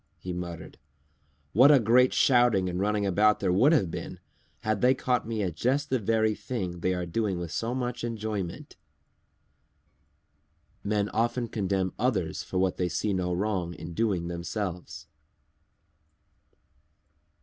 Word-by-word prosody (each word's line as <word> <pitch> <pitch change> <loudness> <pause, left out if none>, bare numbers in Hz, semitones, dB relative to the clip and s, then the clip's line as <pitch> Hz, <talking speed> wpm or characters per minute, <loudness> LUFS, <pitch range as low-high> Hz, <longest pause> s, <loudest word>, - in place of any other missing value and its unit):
he 90 - -6
muttered. 85 -2 -7 0.7
"What 130 +7 +7
a 145 - +7
great 125 +3 +4
shouting 120 -7 +3
and 90 0 -3
running 105 +1 0
about 105 +3 +3
there 95 -2 +1
would 125 - +5
have 115 - +2
been, - - -6 0.4
had 110 -2 -1
they 125 +1 +4
caught 125 -3 -1
me 110 -2 -2
at 90 -4 -3
just 135 - 0
the 130 - +2
very 110 +1 +1
thing 95 -7 -5
they 90 +2 0
are 90 -1 -3
doing 95 +2 -1
with 85 -2 -5
so 115 +10 -2
much 125 -2 -3
enjoyment!" 110 -6 -4 2.1
_Men 105 0 0
often 120 +1 0
condemn 95 -4 -1
others 95 -11 0
for 90 - -5
what 95 -1 +1
they 90 -1 0
see 105 +4 -1
no 90 -1 -1
wrong 90 -2 -2
in 85 +1 -8
doing 95 -4 0
themselves. 85 +1 -5
100 Hz, 145 wpm, -27 LUFS, 90-115 Hz, 2.1 s, What